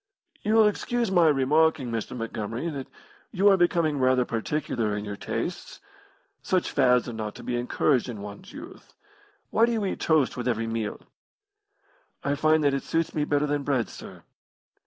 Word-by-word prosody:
"You 215 +1 +1
will 220 -1 +7
excuse 235 +1 -1
my 175 -3 +5
remarking, 145 -1 +2
Mr. 115 +2 -4
Montgomery, 115 +5 -4
that 135 -3 -6 0.4
you 200 +1 +4
are 195 - +6
becoming 170 -5 +2
rather 130 -1 +3
particular 115 -3 -2
in 105 - -5
your 100 -1 -5
tastes. - - -5 0.6
Such 185 -1 0
fads 125 -2 +3
are 120 - -5
not 110 -1 -5
to - - -10
be 125 - -2
encouraged 125 +2 +1
in 115 -4 -6
one's 105 - -10
youth. 330 +6 -12 0.6
Why 230 +1 +4
do - - 0
you 220 -3 -1
eat 190 - -3
toast 155 -5 +2
with 125 0 -4
every 115 -2 0
meal?" 115 -2 -3 1.2
"I 140 - 0
find 155 +2 +3
that 140 -1 +3
it 140 - -1
suits 165 0 -1
me 150 -1 0
better 145 0 +1
than 145 0 -1
bread, 135 -5 0
sir." - - -11
140 Hz, 180 wpm, -26 LUFS, 120-165 Hz, 1.2 s, will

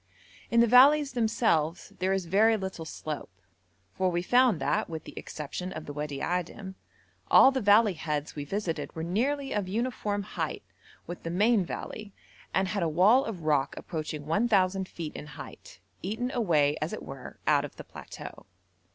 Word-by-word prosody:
In 235 0 +4
the - - +6
valleys 275 +4 +6
themselves 220 - 0
there 185 +1 +1
is 195 -2 0
very 215 +6 +4
little 190 -4 -5
slope, 155 -1 -6 0.6
for 185 -1 +1
we 175 0 -1
found 245 -3 +4
that, - - 0
with 160 -2 -5
the - - -11
exception 155 +5 -6
of 155 -4 -7
the 145 - -7
Wadi 145 -1 -4
Adim, 180 +2 -3 0.6
all 265 - +8
the 265 -1 -1
valley 205 0 +5
heads 150 -3 -3
we 145 - -4
visited 180 +2 -3
were 160 - -4
nearly 270 - -1
of 205 -3 -1
uniform 210 -1 -2
height 210 - -4 0.4
with 175 - -7
the 165 - -5
main 205 +4 +3
valley, 205 +3 -7 0.4
and 190 0 +1
had 200 -1 -1
a 165 - +1
wall 205 - +5
of 190 -7 -6
rock 145 -3 +1
approaching 155 -2 -5
1,000 190 +1 +2
feet 165 -5 -7
in 150 - -7
height, 150 - -11 0.2
eaten 225 +7 -3
away 155 - +2
as 155 - -2
it - - -6
were 135 -2 -9
out 145 -2 +3
of 145 - -8
the - - -9
plateau. - - -10
185 Hz, 175 wpm, -28 LUFS, 155-220 Hz, 0.6 s, all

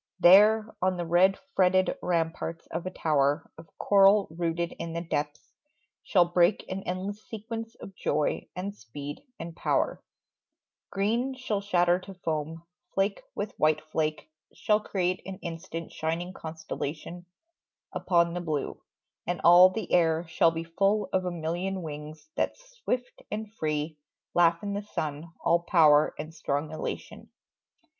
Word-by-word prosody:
There, 210 +5 +6
On 185 0 +1
the 175 - -2
red 180 +3 +4 0.2
fretted 185 0 +3
ramparts 165 -1 -2
of 170 +2 -3
a - - -1
tower 150 -3 +1
Of 160 0 -13
coral 200 0 +5
rooted 170 +1 -2
in 165 - -4
the 170 - -2
depths, 150 -3 -4 0.5
shall 180 -4 +4
break 175 +3 +2
An 190 +1 -4
endless 195 +4 -4
sequence 225 +1 -6
of 195 - -11
joy 150 -3 -1
and 195 +3 -4
speed 140 - -8 0.2
and 165 0 -7
power: - - 0 0.9
Green 230 +7 0
shall 225 -6 -2
shatter 175 -3 +3
to 190 +1 -11
foam; 160 -1 -3 0.3
flake 195 +1 +1
with 205 +1 -3
white 155 0 +3
flake 155 0 -2 0.2
Shall 210 0 +2
create 185 -3 -1
an 190 -1 -6
instant's 165 0 -6
shining 170 +3 -3
constellation 160 +1 -6 0.7
Upon 170 -2 +2
the 175 - -3
blue; 155 -5 -3 0.5
and 175 -1 -1
all 175 +2 +9
the 205 +1 -5
air 165 -1 +3
shall 165 +1 +4
be 165 0 -4
Full 195 +5 +1
of 185 -1 +1
a 180 - -1
million 175 +3 -3
wings 150 0 -8
that - - -1
swift 475 - -5
and 215 0 -5
free 155 -3 -2 0.3
Laugh 170 0 +4
in 200 -1 -2
the 200 - -2
sun, 155 -5 -5
all 170 - +3
power 155 -4 +4
and 155 +2 -6
strong 150 -1 -2
elation. 155 - -6
175 Hz, 145 wpm, -28 LUFS, 160-195 Hz, 0.9 s, all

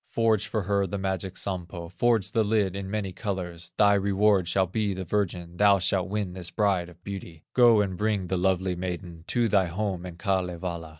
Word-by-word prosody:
Forge 110 -3 +2
for 110 -3 -2
her 100 +1 +1
the 100 - -3
magic 95 -1 -3
Sampo, 90 -3 -3
Forge 100 +2 +1
the 115 -1 +2
lid 105 -3 +1
in 100 -1 -5
many 100 -2 -2
colors, 90 -4 -4
Thy 100 -1 +5
reward 100 -1 +3
shall 95 +2 +2
be 100 +1 -1
the 95 - -4
virgin, 90 -2 -2
Thou 100 0 +6
shalt 95 0 0
win 100 -3 -2
this 90 -2 -4
bride 95 -5 +1
of 90 +1 -18
beauty; 90 -5 -8
Go 120 -4 +6
and 95 -2 -2
bring 105 -1 0
the 95 - -2
lovely 95 0 +1
maiden 90 -2 -5
To 120 -2 +1
thy 100 -4 +3
home 95 0 -3
in 90 - -9
Kalevala." 90 -3 -2
95 Hz, 195 wpm, -27 LUFS, 90-105 Hz, -, Thou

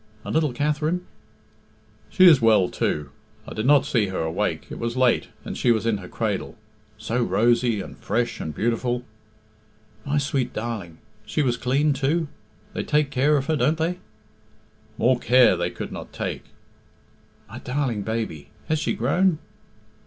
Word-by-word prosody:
"And - - -4
little 155 -3 +2
Katherine?" 150 +6 -1 1.0
"She 185 - +5
is 155 -7 +8
well 110 -5 +4
too. 75 -2 -2 0.4
I - - -7
did 110 +3 -2
not 145 -1 +5
see 110 -5 +1
her 95 -2 -3
awake. 80 0 -2
It - - -6
was 115 +1 -3
late, 130 -2 +3 0.2
and - - -5
she 120 - +2
was 110 -1 +1
in 115 -2 +1
her 95 -2 -9
cradle. - - -3 0.4
So 120 +2 -2
rosy, 120 -1 +2
and - - -9
fresh, 120 +3 -2
and 80 - -4
beautiful!" 120 - -1 1.0
"My 145 +4 -1
sweet 135 -3 -1
darling! 105 -7 -5 0.3
She 150 - -1
was 125 -3 +1
clean 140 +5 +1
too? 145 +4 0 0.4
They - - -2
take 150 -1 +1
care 145 +3 +3
of 135 - -1
her, 155 - +1
don't 150 +3 +2
they?" 170 +3 -1 1.0
"More 125 +2 +3
care 125 0 +5
they - - -1
could - - -7
not - - -8
take." - - -4 1.0
"My - - -9
darling 125 -5 -2
baby! 110 -8 -4 0.2
Has 155 0 +1
she - - 0
grown?" 165 +8 +2
125 Hz, 160 wpm, -24 LUFS, 115-150 Hz, 1.0 s, is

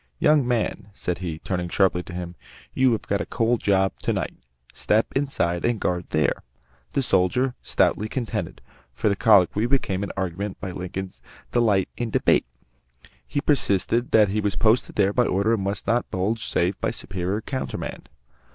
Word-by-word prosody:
"Young 150 - +3
man," 110 -4 -1
said 90 -3 -3
he, 85 -4 -4
turning 90 +1 -3
sharply 95 -1 +2
to 90 - -10
him, 90 -1 -5 0.4
"you 130 -1 +3
have 110 - -2
got 100 - -1
a - - -3
cold 115 +1 +1
job 95 -1 +2
to - - -1
night. - - -2 0.4
Step 110 +2 +2
inside 90 -12 0
and 120 -2 +1
guard 90 -2 -1
there." 80 0 +1 0.5
The 135 - +1
soldier 125 +6 +2
stoutly 105 +1 +1
contended 120 -2 -4 0.3
for - - +1
the 100 - +1
colloquy 105 0 +4
became 120 -8 0
an 100 - -3
argument 95 +1 -3
by 95 - -5
Lincoln's 90 +1 -6 0.3
delight 105 -6 +3
in 120 -1 -2
debate. - - +2 0.8
He 145 - -1
persisted 120 - +1
that 105 -2 +5
he 105 +2 0
was 105 -1 -1
posted 115 +2 +2
there 100 -1 +2
by 125 +1 +3
orders 100 +4 +2
and 105 -4 0
must 100 +1 -3
not 120 +1 +1
budge 105 +5 -1
save 90 +2 0
by - - +1
a - - -4
superior 95 +2 -3
countermand. 130 +4 -5
100 Hz, 175 wpm, -24 LUFS, 95-115 Hz, 0.8 s, that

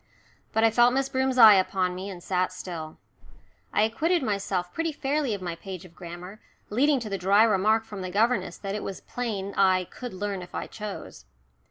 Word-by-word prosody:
But 220 - +1
I 225 - +5
felt 240 +2 +4
Miss 270 0 0
Broom's 260 0 0
eye 220 -3 +10
upon 185 -1 +1
me, 185 +2 -6
and 180 -3 -9
sat 185 -1 0
still. 170 -4 -7 0.7
I - - +3
acquitted 310 +9 +1
myself 195 -5 -2
pretty 330 0 -1
fairly 285 -4 -1
of 190 - -8
my 175 -2 -3
page 185 0 -8
of 175 - -15
grammar, 180 +3 -9 0.3
leading 275 +5 +3
to 225 - -5
the 195 -2 -3
dry 200 +4 +5
remark 220 +1 +3
from 205 -3 -7
the 185 - -4
governess 225 +6 +1
that 195 -1 -5
it 210 - -3
was 195 - -6
plain 205 -5 -4
I 185 -1 +4
"could 245 -6 -7
learn 200 0 -3
if 175 - -10
I - - -3
chose." 200 - -8
200 Hz, 200 wpm, -26 LUFS, 185-230 Hz, 0.7 s, eye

